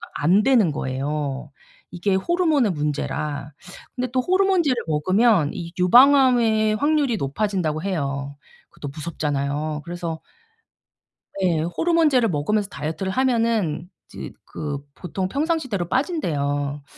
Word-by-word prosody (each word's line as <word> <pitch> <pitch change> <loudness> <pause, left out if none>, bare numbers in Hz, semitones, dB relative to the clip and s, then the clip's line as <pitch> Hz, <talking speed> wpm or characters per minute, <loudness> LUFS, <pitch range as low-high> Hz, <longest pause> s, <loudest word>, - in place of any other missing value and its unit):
안 180 +8 +3
되는 230 - +4
거예요 140 +1 -3 0.4
이게 185 +2 -1
호르몬의 305 - +2
문제라. 150 -1 -3 0.4
근데 255 0 -1
또 255 - +2
호르몬제를 370 -5 +2
먹으면 185 +2 +3
이 170 -2 -6
유방암의 235 0 +5
확률이 290 -3 +1
높아진다고 160 0 -1
해요. 140 -6 -3 0.3
그거도 145 - -8
무섭잖아요. 150 -1 -3
그래서 170 -2 -5 1.2
예. 170 -4 +2
호르몬제를 270 - +2
먹으면서 195 +7 0
다이어트를 160 +6 -4
하면은 230 - 0 0.2
이제 - - -7
그 145 -2 -5
보통 185 +1 -4
평상시대로 275 - -1
빠진대요. 145 - -1
180 Hz, 295 characters per minute, -22 LUFS, 150-250 Hz, 1.2 s, 유방암의